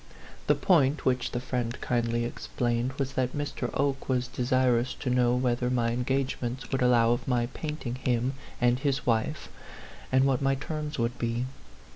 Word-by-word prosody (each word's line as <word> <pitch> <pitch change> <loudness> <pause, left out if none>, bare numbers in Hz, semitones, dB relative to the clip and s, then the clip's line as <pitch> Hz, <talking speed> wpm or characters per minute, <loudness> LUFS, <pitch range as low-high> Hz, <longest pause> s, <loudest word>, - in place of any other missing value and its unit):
The 150 - +5
point, 145 -2 +3
which 125 -1 +1
the 120 - -3
friend 125 -1 -3
kindly 120 -1 0
explained, 120 +1 -2
was 135 -1 -3
that 130 +1 -1
Mr. 145 -4 -3
Oke 140 -1 0
was 125 -1 +1
de 125 - -6
sirous 125 0 +2
to 130 - -2
know 125 -1 +3
whether 125 -1 +1
my 120 -2 +1
engagements 125 0 -2
would 135 - 0
allow 120 -2 +5
of 120 - -1
my 120 -2 +2
painting 150 -6 -4
him 125 0 0 0.3
and 120 0 +3
his 135 -2 0
wife, 120 +6 0 0.6
and 130 0 +4
what 135 -1 +2
my 135 0 +2
terms 150 +2 -4
would 120 0 -1
be. 120 +1 -1
125 Hz, 170 wpm, -28 LUFS, 120-135 Hz, 0.6 s, The